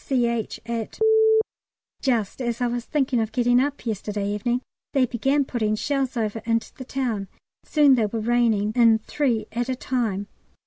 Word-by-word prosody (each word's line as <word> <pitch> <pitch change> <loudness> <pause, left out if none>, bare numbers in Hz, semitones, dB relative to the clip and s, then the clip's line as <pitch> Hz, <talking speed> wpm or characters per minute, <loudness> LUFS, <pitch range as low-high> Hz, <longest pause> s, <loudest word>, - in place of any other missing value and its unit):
C.H., 235 -4 -1
at. 230 -2 -4 1.0
Just 235 -3 0
as 235 -2 -2
I 245 - +1
was 240 0 -2
thinking 270 -5 0
of 220 0 -2
getting 245 0 +3
up 285 +1 -2
yesterday 210 -2 -3
evening 235 +4 -1 0.3
they 270 -2 +4
began 270 +4 +1
putting 215 -5 -1
shells 270 +1 -1
over 220 -1 -2
into 230 0 -1
the 260 - -9
town, 255 -4 -1
and 195 -1 -6 0.4
soon 295 -3 +5
they 230 -4 +3
were 225 +2 -3
raining 220 -2 +1
in 230 -2 +6
three 230 -1 -1
at 240 +2 -2
a 260 - 0
time. 230 -6 -2
235 Hz, 170 wpm, -24 LUFS, 220-255 Hz, 1.0 s, in